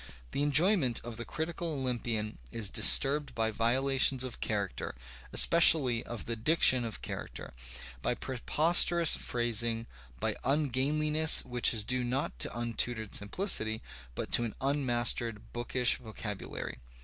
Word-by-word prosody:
The - - -3
enjoyment 145 - +2
of 115 -1 -9
the 120 - -6
critical 170 +2 -5
Olympian 120 - -4
is 105 -4 -3
disturbed 145 +1 +3
by 110 -1 -1
violations 130 +3 +1
of 130 -2 -6
character, 100 - -4 0.4
especially 145 -8 +5
of 120 -1 -8
the 115 - -4
diction 130 0 +3
of 110 - -8
character, - - -8 0.5
by 125 - -1
preposterous 165 +6 +3
phrasing, 115 -1 -1 0.3
by - - -2
ungainliness 150 +3 +4
which 125 -1 +2
is 110 -3 0
due 125 +3 0
not 120 - -4
to 105 - -1
untutored 115 -2 -3
simplicity, 110 - -1 0.3
but - - -6
to 120 - +3
an 115 -3 -6
unmastered 120 -5 -2
bookish 120 +1 0
vocabulary. 105 - -7
125 Hz, 125 wpm, -29 LUFS, 115-145 Hz, 0.5 s, especially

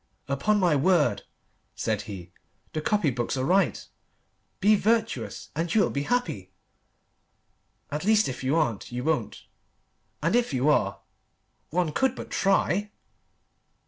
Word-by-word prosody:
"Upon 205 +10 +1
my 175 -5 +3
word," 145 - +2 0.5
said - - -1
he, 90 -3 -8 0.4
"the 155 - -2
copy 185 -4 +1
books 120 +2 -2
are 130 - 0
right 190 +6 +2 0.7
'Be 210 +2 +5
virtuous 225 +2 -1
and 165 +2 -2
you 220 - +6
will - - +1
be 140 - -1
happy.' 245 - -1 1.4
At 150 +3 -3
least 215 +1 +4
if 130 0 -5
you 135 +4 +1
aren't, 125 -12 -1
you 125 +1 -4
won't. 160 +2 -1 0.8
And - - +2
if 240 - +1
you 130 +4 +2
are.... 150 - +1 0.7
One 170 -1 0
could 265 - +1
but - - -8
try!" 195 +1 +1
160 Hz, 140 wpm, -26 LUFS, 135-205 Hz, 1.4 s, you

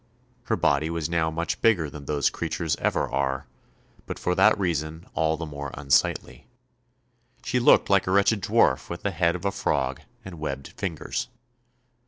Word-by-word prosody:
Her - - +1
body 75 +2 +1
was 85 -1 -3
now 80 -1 +1
much 85 +1 -3
bigger 95 -9 +3
than 70 0 -10
those 70 -1 +1
creatures 80 -1 -2
ever - - 0
are, 65 0 -1 0.6
but - - -5
for 90 - 0
that 110 +4 +5
reason 80 -3 -2
all 80 0 +1
the 80 - -4
more 70 -2 -6
unsightly. 70 -1 0 1.0
She 125 - 0
looked 120 - +5
like 100 -2 +3
a - - +1
wretched 100 +2 +3
dwarf 65 -5 +2
with 85 - -6
the 100 - 0
head 85 -1 +1
of 90 - -6
a 100 - +2
frog - - -1 0.2
and 90 -4 -9
webbed 70 -3 -4
fingers. 120 - -4
80 Hz, 170 wpm, -25 LUFS, 75-90 Hz, 1.0 s, that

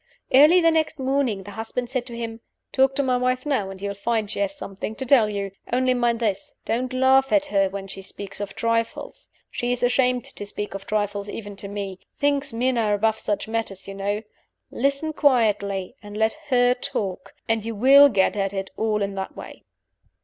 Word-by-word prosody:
Early 300 +7 +8
the 330 -1 +5
next 320 -2 0
morning 260 -7 0
the 205 - -9
husband 225 +4 -4
said 255 -2 -2
to 235 -2 -7
him, 230 -1 -5 0.3
"Talk 270 0 +3
to 280 - +1
my 255 -1 +2
wife 255 +1 0
now, 260 -10 0
and 190 0 -9
you'll 200 +1 -3
find 215 +1 -1
she - - -4
has 195 -1 -1
something 200 +2 -6
to 265 - -5
tell 245 -5 +5
you. 200 -1 -3 0.2
Only 255 +1 +2
mind 240 -2 +1
this. 205 -4 -2
Don't 250 +3 -1
laugh 265 +1 +4
at 300 -1 +4
her 195 -8 +2
when 195 0 -6
she 195 0 -8
speaks 200 +1 -8
of 205 -1 -5
trifles. 230 - -2 0.2
She 245 0 -2
is 245 - -1
half - - +4
ashamed 250 -1 +2
to - - -5
speak 205 0 -3
of 195 0 -7
trifles, 205 -1 -1
even 205 -1 -7
to 200 - -5
me. 200 -2 -5 0.2
Thinks 285 -1 +1
men 245 +2 0
are 210 -2 +2
above 220 +1 +1
such 205 0 -2
matters, 220 -4 -4
you 195 - -6
know. 200 +2 -2 0.5
Listen 280 +4 0
quietly, 210 -9 +1
and 205 0 -9
let 220 0 +2 0.2
her 245 -1 +4
talk 245 -8 -4
and 225 -1 +1
you 225 0 -4
will 275 +6 +8
get 200 -5 +2
at 195 -1 -1
it 195 -1 -4
all 215 -2 0
in 200 0 -3
that 190 -1 -5
way." - - -10
225 Hz, 210 wpm, -24 LUFS, 200-255 Hz, 0.5 s, Early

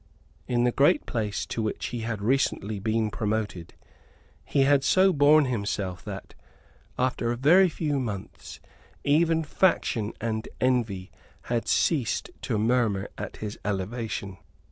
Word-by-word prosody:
In 120 -1 +1
the 125 - +3
great 140 +4 +3
place 105 -5 -2
to 115 - -3
which 110 -1 -3
he 120 - -4
had 110 -2 -4
recently 110 -4 0
been 110 +1 0
promoted, 105 -6 -3 0.7
he 140 - +1
had 140 0 +4
so 190 +5 +4
borne 150 0 +5
himself 100 -6 -3
that, - - -7 0.6
after 125 -2 0
a - - -1
very 175 +9 +5
few 150 -3 -1
months, 105 -7 -6 0.4
even 160 +2 +3
faction 145 - +1
and 110 0 -3
envy 115 -7 0 0.3
had 120 -1 -2
ceased 135 -10 +1
to - - -1
murmur 110 -3 +1
at - - -7
his 105 - -6
elevation. 100 -1 -3
115 Hz, 135 wpm, -26 LUFS, 105-140 Hz, 0.7 s, borne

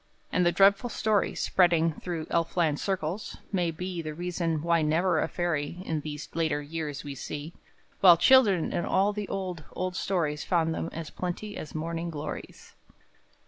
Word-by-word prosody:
And 180 - +2
the 175 - +4
dreadful 200 +6 +4
story, 215 -3 +1
spreading 170 -3 +3
Through 165 0 -5
Elfland 165 -2 +1
circles, 190 0 -3
may 180 -4 +1
be 175 +2 -4
The 155 -1 -6
reason 170 -2 -2
why 170 -1 +3
never 160 +2 +2
a - - +1
fairy 170 -2 -2
In 160 -2 -1
these 150 0 -6
later 160 -2 0
years 150 -1 -5
we 145 -1 -6
see, 150 +4 -6 0.5
While 175 -3 +8
children 210 -8 +5
in - - 0
all 195 +2 +2
the 205 -1 -4
old, 185 -4 -4
old 185 0 -3
stories 155 -7 -1
Found 165 -3 +1
them 165 - -3
as 165 -1 -6
plenty 185 +4 -4
as 155 - -7
morning 165 +2 -3
glories! 155 -2 -7
170 Hz, 165 wpm, -28 LUFS, 155-185 Hz, 0.5 s, While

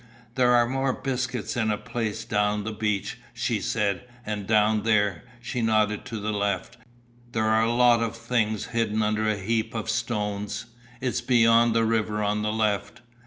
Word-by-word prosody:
"There 125 -1 +3
are 120 0 +4
more 135 +1 0
biscuits 130 -3 -3
in 110 -3 +1
a 105 - +1
place 110 -1 -4
down 105 0 0
the 110 - -3
beach," 105 -2 -2 0.2
she - - -1
said, 100 +2 -1 0.2
"and 105 -2 -4
down 110 0 +3
there," 105 -5 +1 0.2
she 120 +1 -3
nodded 110 -2 +1
to 115 - -5
the 105 +1 -2
left, 100 -3 -2 0.6
"there 110 -1 +1
are 110 0 +3
a 115 +1 +2
lot 120 -1 +4
of 115 -1 -2
things 115 -3 -1
hidden 110 -2 +1
under 110 0 +1
a 105 - 0
heap 110 +4 -1
of 110 0 -2
stones. 105 -1 -2 0.4
It's 125 -1 -1
beyond 115 -1 +4
the 115 0 +3
river 110 -1 0
on 105 +1 0
the 105 0 0
left." 110 +1 -1
110 Hz, 175 wpm, -26 LUFS, 105-115 Hz, 0.6 s, are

